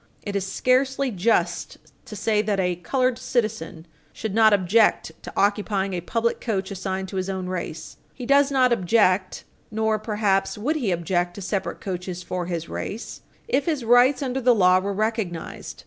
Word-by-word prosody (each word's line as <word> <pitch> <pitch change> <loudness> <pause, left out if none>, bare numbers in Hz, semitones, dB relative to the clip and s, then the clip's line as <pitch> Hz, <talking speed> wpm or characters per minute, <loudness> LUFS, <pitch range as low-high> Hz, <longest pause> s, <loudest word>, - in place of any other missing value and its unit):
It 205 -1 -5
is 195 -1 -2
scarcely 265 +1 +1
just 180 -3 0 0.3
to 215 - -8
say 210 +1 +1
that 210 -2 -1
a 180 -2 0
colored 255 +7 0
citizen 215 -9 -2 0.3
should 220 -3 -5
not 220 0 +5
object 205 -1 +3
to - - -8
occupying 200 -1 +1
a 175 - -2
public 230 +6 -1
coach 200 -5 -2
assigned 190 0 -3
to 190 - -5
his 185 +1 -2
own 190 -1 -3
race. 170 -3 -5
He 250 - -8
does 280 +2 +4
not 255 -3 +3
object, 185 -2 +2 0.3
nor, 220 0 0
perhaps, 210 -3 0
would 290 +10 -1
he 240 -9 -1
object 175 0 -1
to 200 - -8
separate 190 +1 -3
coaches 180 -1 -5
for 180 0 -4
his 170 -2 -3
race 225 +3 -6 0.3
if 285 -11 +1
his 295 -7 -1
rights 250 +4 +5
under 265 0 -2
the 245 -1 +4
law 185 -2 +5
were 200 +2 -3
recognized. 210 -5 -3
205 Hz, 175 wpm, -24 LUFS, 185-235 Hz, 0.3 s, not